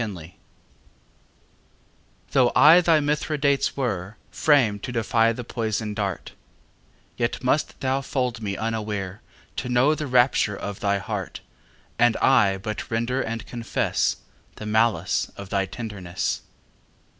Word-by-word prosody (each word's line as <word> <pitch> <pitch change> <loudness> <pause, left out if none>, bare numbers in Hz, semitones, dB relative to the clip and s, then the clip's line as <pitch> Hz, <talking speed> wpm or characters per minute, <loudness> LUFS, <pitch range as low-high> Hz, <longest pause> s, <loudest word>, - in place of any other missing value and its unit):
XXVII 90 -6 -8 1.9
Though 125 -3 +4
I 160 +5 +8
thy 165 -2 +4
Mithridates 145 -2 0
were, 105 -6 -3
Framed 120 -9 +3
to - - -5
defy 115 -1 +2
the 120 +2 -5
poison 110 -2 -3
dart, 100 -3 -3 0.9
Yet 120 +1 -2
must 135 +4 0
thou 135 +1 0
fold 125 -4 -2
me 100 -2 -3
unaware 105 -3 -3 0.4
To 125 - -3
know 125 +5 +4
the 150 -1 -4
rapture 125 -5 +3
of 100 -1 -6
thy 100 0 +1
heart, 100 -1 -5 0.6
And 120 -1 +4
I 105 -8 +4
but 105 +2 -5
render 120 +3 0
and 115 0 -4
confess 115 -2 -1 0.4
The 110 - -8
malice 110 +1 +1
of 100 -1 -8
thy 95 -1 0
tenderness. 95 -5 -4
115 Hz, 125 wpm, -24 LUFS, 100-130 Hz, 1.9 s, I